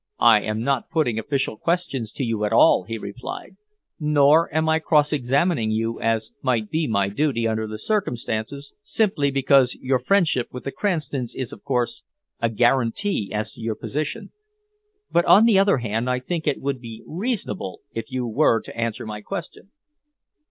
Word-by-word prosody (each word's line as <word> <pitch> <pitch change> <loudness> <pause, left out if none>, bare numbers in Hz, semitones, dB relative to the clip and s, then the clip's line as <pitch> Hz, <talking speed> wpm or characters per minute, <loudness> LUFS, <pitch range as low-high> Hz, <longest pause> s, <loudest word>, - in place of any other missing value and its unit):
"I 115 -3 +6
am 110 +1 -3
not 135 -1 0
putting 135 -9 0
official 135 -1 -2
questions 165 -10 -2
to - - -3
you 115 -3 -1
at 105 - 0
all," 90 - +5
he 115 +1 -4
replied, 115 - -7 0.4
"nor 150 +1 +4
am 160 +1 +1
I 160 0 +3
cross 150 -2 +2
examining 140 -1 +1
you, 115 +1 -1
as 115 -1 0
might 115 -5 0
be 160 0 0
my 100 -4 +1
duty, 115 +1 0
under 110 0 -1
the 110 0 -6
circumstances, 140 - -3
simply 190 -11 +1
because 135 -1 +3
your 130 0 0
friendship 155 -4 +2
with 125 - -8
the 135 - -4
Cranstons 145 - -2
is, 130 -4 -4
of - - -12
course, 125 -4 -1 0.4
a 115 - +2
guarantee 120 - +1
as 105 0 -3
to - - -13
your 110 -1 -2
position. 155 - -4 0.8
But 170 - +3
on 215 +4 +7
the 215 -4 +5
other 195 -5 +4
hand, 115 +1 -2
I 125 - +1
think 160 +5 -4
it 145 - +1
would 135 -2 -3
be 115 -2 -9
reasonable 175 - -4
if 115 -1 -4
you 130 -1 -2
were 115 0 +3
to - - -11
answer 115 -2 -3
my 105 -1 -6
question." 195 - -7
130 Hz, 175 wpm, -23 LUFS, 115-155 Hz, 0.8 s, on